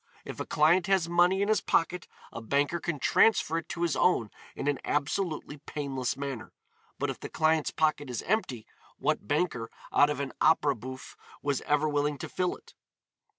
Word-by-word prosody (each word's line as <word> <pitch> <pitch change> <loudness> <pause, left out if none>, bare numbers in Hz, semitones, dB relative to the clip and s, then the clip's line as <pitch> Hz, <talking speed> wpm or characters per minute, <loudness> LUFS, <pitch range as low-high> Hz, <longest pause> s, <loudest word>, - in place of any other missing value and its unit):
If - - -7
a - - -4
client 165 +4 +3
has 190 -4 +2
money 175 +3 +3
in - - 0
his 215 0 +2
pocket 175 +1 0 0.3
a 115 - -6
banker 145 +8 0
can 170 -2 -3
transfer 165 0 +3
it 165 - -12
to 175 0 -3
his 170 - +1
own 115 - +2 0.2
in 140 - -4
an 145 -1 +1
absolutely 150 +1 -2
painless 140 -3 -3
manner, 135 -5 -5 0.4
but - - -1
if - - -9
the - - -7
client's 160 -1 +2
pocket 155 -3 0
is 120 -3 -4
empty 150 - -1 0.3
what - - -1
banker, 145 -6 0 0.2
out 145 - +5
of 145 -2 -2
an 140 -1 -3
opéra 150 -2 +4
bouffe, 130 +3 -9 0.3
was 140 -2 0
ever 150 +1 +2
willing 145 0 0
to - - -6
fill 180 -1 -1
it? - - -18
150 Hz, 185 wpm, -29 LUFS, 140-170 Hz, 0.4 s, out